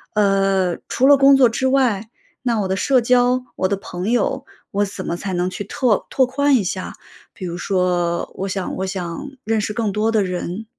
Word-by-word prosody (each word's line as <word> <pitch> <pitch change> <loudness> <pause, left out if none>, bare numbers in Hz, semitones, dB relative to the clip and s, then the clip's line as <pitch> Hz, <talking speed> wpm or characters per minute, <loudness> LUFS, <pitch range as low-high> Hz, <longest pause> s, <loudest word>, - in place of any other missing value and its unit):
呃， 195 -3 +2
除 260 - +1
了 285 - +8
工 275 0 +6
作 255 - +6
之 235 +3 -1
外， 240 -6 +1 0.3
那 235 -4 0
我 195 - -1
的 190 - 0
社 255 +6 +2
交， 250 +1 +3
我 185 - 0
的 200 +1 -1
朋 185 +1 -5
友， 260 +3 0 0.2
我 200 +1 +1
怎 195 -1 -7
么 170 - -2
才 190 +2 -5
能 180 0 0
去 190 +2 -5
拓 225 +2 0
拓 260 - +3
宽 280 +2 +2
一 230 - +2
下？ 185 0 -4 0.4
比 185 - -8
如 170 - -5
说 180 -2 0
我 195 - -3
想 190 -1 -3
我 190 - -2
想 190 +8 -5
认 220 0 0
识 210 - -3
更 220 -2 -1
多 215 +3 0
的 215 -2 +2
人， 180 +3 -4
205 Hz, 225 characters per minute, -20 LUFS, 185-250 Hz, 0.4 s, 了